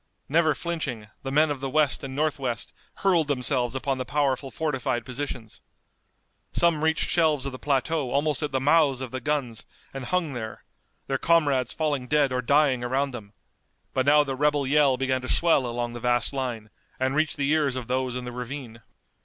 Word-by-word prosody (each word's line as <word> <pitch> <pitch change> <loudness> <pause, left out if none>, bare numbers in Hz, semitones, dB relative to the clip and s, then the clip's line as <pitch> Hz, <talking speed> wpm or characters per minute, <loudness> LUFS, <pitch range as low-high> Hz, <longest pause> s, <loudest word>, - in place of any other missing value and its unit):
Never 155 0 +3
flinching, 145 -12 -4
the 135 - -5
men 150 +2 +4
of 140 - -3
the 135 0 -3
west 150 -1 +1
and 135 -1 -6
northwest 140 -6 -1 0.3
hurled 170 -6 +4
themselves 125 -2 +1
upon 135 0 -1
the - - -1
powerful 140 -1 0
fortified 130 -6 -2
positions. 125 -4 -6 0.9
Some 170 -3 +2
reached 160 0 +2
shelves 155 -5 +2
of 140 - -2
the 130 - -8
plateau 145 0 0
almost 145 +3 0
at 150 - -2
the 135 - +1
mouths 145 -1 +3
of 130 -3 -5
the 130 - -4
guns 125 -5 -2 0.3
and 135 -2 -5
hung 175 -3 0
there, 110 -3 -6 0.4
their 135 -1 -1
comrades 145 -7 +2
falling 145 -5 -1
dead 145 -1 +2
or 125 0 0
dying 135 -1 +3
around 135 +3 0
them, 110 -4 -9 0.6
but 130 +1 0
now 150 +1 +6
the 135 -2 -3
rebel 145 0 +1
yell 140 -1 +3
began 130 0 0
to 130 - -6
swell 160 -7 +3
along 120 0 -3
the 120 - -6
vast 120 +3 +1
line, 120 -5 -4 0.3
and 130 +1 +1
reached 155 -1 +1
the 140 0 +1
ears 150 -4 +2
of 125 -3 -5
those 130 0 -1
in 125 0 -4
the 125 - -5
ravine. 125 -1 -7
135 Hz, 190 wpm, -26 LUFS, 125-150 Hz, 0.9 s, now